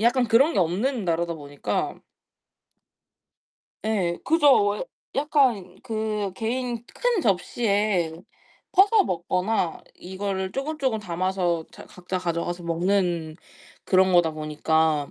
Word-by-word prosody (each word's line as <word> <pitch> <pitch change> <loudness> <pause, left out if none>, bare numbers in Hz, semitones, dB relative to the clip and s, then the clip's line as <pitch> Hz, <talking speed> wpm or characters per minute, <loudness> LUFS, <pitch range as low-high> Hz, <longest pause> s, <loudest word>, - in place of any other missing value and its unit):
약간 245 +3 +3
그런 270 +8 +4
게 - - +1
없는 205 +8 0
나라다 170 0 0
보니까 145 -2 -3 1.9
예 195 -6 0
그죠. 290 -10 +5
왜 210 - -3 0.3
약간 275 -9 +1
그 215 -4 -2
개인 235 +2 -3
큰 485 -5 0
접시에 200 - +1 0.6
퍼서 400 +2 +5
먹거나 180 +1 -1
이거를 190 0 -4
쪼금쪼금 275 -4 -1
담아서 180 -2 -1
자 - - -12
각자 180 +1 -6
가져가서 175 0 -3
먹는 170 -2 0 0.5
그런 185 0 +4
거다 175 -2 +4
보니까 155 -1 0
190 Hz, 225 characters per minute, -25 LUFS, 170-235 Hz, 1.9 s, 그죠